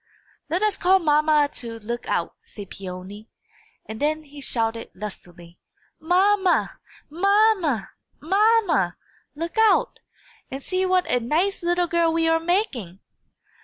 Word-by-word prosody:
'" - - -36
"Let 350 +6 0
us 425 -2 +1
call 375 +2 +4
mamma 305 -3 +3
to 230 -2 -7
look 235 +3 -6
out," - - -1
said 205 -3 -11
Peony; 195 +3 -9 0.6
and 220 0 -8
then 310 +1 0
he 290 -1 -13
shouted 230 -3 -2
lustily, 175 -4 -10 0.4
"Mamma! 375 +3 +2 0.3
mamma!! 380 - +2 0.3
mamma!!! 385 - +2 0.4
Look 335 +6 -4
out, 445 -1 +3 0.5
and 270 +1 -7
see 370 0 -1
what 370 -1 +2
a 250 - +1
nice 335 +12 -1
'ittle 350 +1 +1
girl 340 -1 +1
we 330 0 +1
are 325 0 +3
making." 325 - -2
315 Hz, 130 wpm, -23 LUFS, 230-370 Hz, 0.6 s, call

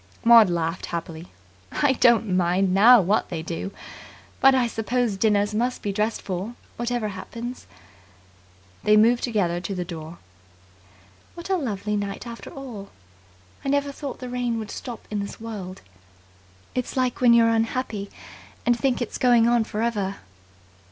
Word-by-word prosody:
Maud 230 -4 +8
laughed 170 0 -2
happily. 170 0 -6 0.4
"I 285 -2 +2
don't 230 -6 +3
mind 180 +1 +2
now 230 +6 +8
what 195 +4 +1
they 165 -2 -4
do. 165 +3 -4 0.7
But 270 0 +6
I 255 -2 +3
suppose 230 -1 -1
dinners 205 0 +2
must 245 +4 -1
be 205 - -1
dressed 215 +2 -1
for, 195 +5 -4 0.2
whatever 240 -2 -2
happens." 230 +6 -7 1.1
They 210 0 +4
moved 235 +3 +4
together 185 -7 0
to 195 +1 -4
the 180 -1 -3
door. 165 -1 -8 1.2
"What 345 +3 -6
a - - +4
lovely 210 - -2
night 200 +2 -4
after 235 -1 -8
all! 240 -8 -9 0.7
I 275 - -2
never 285 0 +1
thought 280 -2 -6
the 255 - -7
rain 245 -1 -2
would 215 -2 -6
stop 240 -3 -7
in 210 - -1
this 200 0 -6
world. 200 -5 -7 0.9
It's 250 +1 -3
like 255 -1 0
when 240 -2 +6
you're 230 -1 +5
unhappy 225 -2 -1 0.6
and 240 +1 +4
think 245 +1 0
it's 235 - -7
going 240 -2 +5
on 240 -1 +3
for 215 0 -3
ever." 205 -4 -1
225 Hz, 155 wpm, -24 LUFS, 195-245 Hz, 1.2 s, Maud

